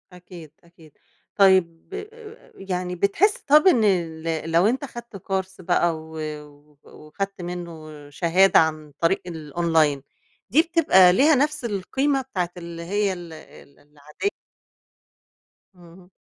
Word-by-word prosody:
أكيد، 175 -3 -13
أكيد، 170 -2 -20 0.4
طيب، 190 - +2 0.6
يعني 180 -2 -4
بتحس 245 - +2
طب 305 +6 +4
إن 245 -12 +5
ال 165 -4 -1
لو 170 +3 +3
أنت 260 +5 -1
خدت 235 -5 -10
كورس 190 0 -4
بقى، 175 -1 +1
و 160 0 -11 0.7
وخدت 195 +6 -7
منه 160 -4 -8
شهادة 175 +6 +3
عن 155 -2 -1
طريق 170 +3 +1
الأونلاين، 160 -3 0 0.5
دي 275 +11 +5
بتبقى 305 - +4
ليها 290 - +4
نفْس 295 0 0
القيمة 265 +7 -1
بتاعة 185 -10 -3
اللي 170 -1 -8
هي 200 +2 -1
ال 175 -2 -10
ال 140 -2 -16
العادية؟ 150 - -6 1.4
اهم. 180 +1 -17
180 Hz, 120 wpm, -23 LUFS, 165-200 Hz, 1.4 s, إن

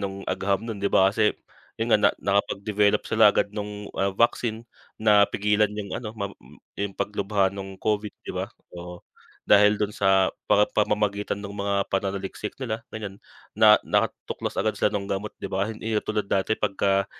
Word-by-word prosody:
no'ng 100 0 -5
agham 95 +3 -1
no'n, 110 -4 -5
di 100 - +1
ba, 95 +1 +4
kasi 105 -1 +2 0.4
'yun 115 +1 -1
nga, 105 - +5
na - - +6
nakapag-develop 100 +1 +1
sila - - +5
agad 100 - +1
no'ng, 105 -1 -6
ah, 100 0 0
vaccine, 115 -1 +1 0.3
napigilan 105 0 +3
'yung 100 -2 -5
ano 110 -2 -5
mab 100 -1 -4
m - - -17 0.2
'yung 100 -1 -3
paglubha 100 -1 0
no'ng 95 -1 -7
COVID, 105 +1 -1
di - - -5
ba, - - -3 0.2
oo. 90 0 -9 0.4
Dahil 105 0 +5
do'n 105 0 -2
sa 95 -1 +3 0.2
pa 105 0 +5
pamamagitan 105 -1 0
ng 100 0 -7
mga 100 0 -1
pananaliksik 95 +3 -3
nila 115 -4 -4
ganiyan, 105 -2 -7 0.3
na - - +7
nakatuklas - - -2
agad - - +1
sila - - +1
nung 100 -1 -3
gamot 100 +1 -3
'di - - -5
ba. 95 +3 -1
Hindi 110 0 -4
yun 105 - +1
tulad 105 -2 -2
dati, 100 +3 0
pagka 100 -1 +1
100 Hz, 175 wpm, -25 LUFS, 100-105 Hz, 0.4 s, na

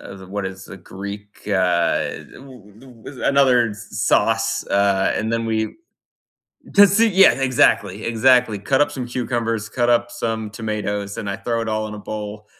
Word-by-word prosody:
uh, 95 -1 -11
what 100 0 -3
is 95 0 -8
the - - -10
Greek, 100 +3 -10
uh, 90 -4 0
w 125 -2 -16 0.2
another 125 -5 +3
sauce, 105 - 0
uh, 100 -1 +2
and 110 - -2
then 115 0 -1
we 110 -1 -1 1.0
Tzatziki 205 +3 +5
yeah, 195 +1 +7
exactly, 130 -6 +1
exactly. 120 -2 +3
Cut 135 +7 0
up 145 - +3
some 125 -2 -5
cucumbers, 115 -3 -2
cut 120 +1 0
up 120 0 +2
some 115 -2 -4
tomatoes, 105 -2 -4
and 105 - -4
I 100 - -3
throw 115 -1 -2
it 115 - -4
all 110 0 -1
in 105 - -7
a - - -8
bowl, 105 0 -7
110 Hz, 155 wpm, -20 LUFS, 100-120 Hz, 1.0 s, yeah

